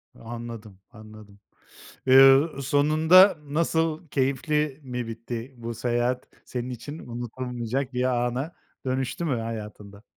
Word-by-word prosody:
Anladım, 115 -3 -9
anladım. 110 -2 -14 0.7
Eee, 135 +1 +8 0.2
sonunda 155 +7 +5
nasıl 160 +2 -1
keyifli 140 +2 0
mi 125 -2 -4
bitti? 115 +3 -6
Bu 115 0 -6
seyahat 120 +2 -1 0.2
senin 125 0 -5
için 145 +6 -7
unutulmayacak 125 +2 -4
bir 125 0 -1 0.2
ana 130 +7 -3 0.3
dönüştü 130 +6 -2
mü 135 -7 0
hayatında? 105 -2 -7
125 Hz, 105 wpm, -25 LUFS, 115-145 Hz, 0.7 s, Eee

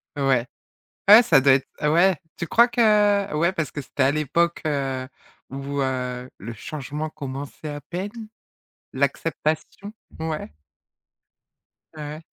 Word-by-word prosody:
Ouais, 135 -4 +1 0.6
ouais 215 +4 +10
ça 150 - +5
doit 135 0 +6
être 135 0 +1 0.2
ouais, 175 +5 +4 0.2
tu 170 - -3
crois 235 +7 +5
que 210 -4 +3
ouais 170 +4 +2
parce 165 -7 -2
que 145 - -5
c'était 135 0 -2
à 135 - +4
l'époque, 155 +4 0
heu, 135 -3 -2 0.4
où, 140 +1 -4
heu, 125 -1 -3
le 115 +4 -7
changement 150 +6 -5
commençait 145 0 -7
à 145 0 -6
peine, 185 +6 -5 0.8
l'acceptation, 155 +7 -2 0.3
ouais. 160 -1 -4 1.5
Ouais. 150 0 -7
150 Hz, 125 wpm, -23 LUFS, 135-170 Hz, 1.5 s, ouais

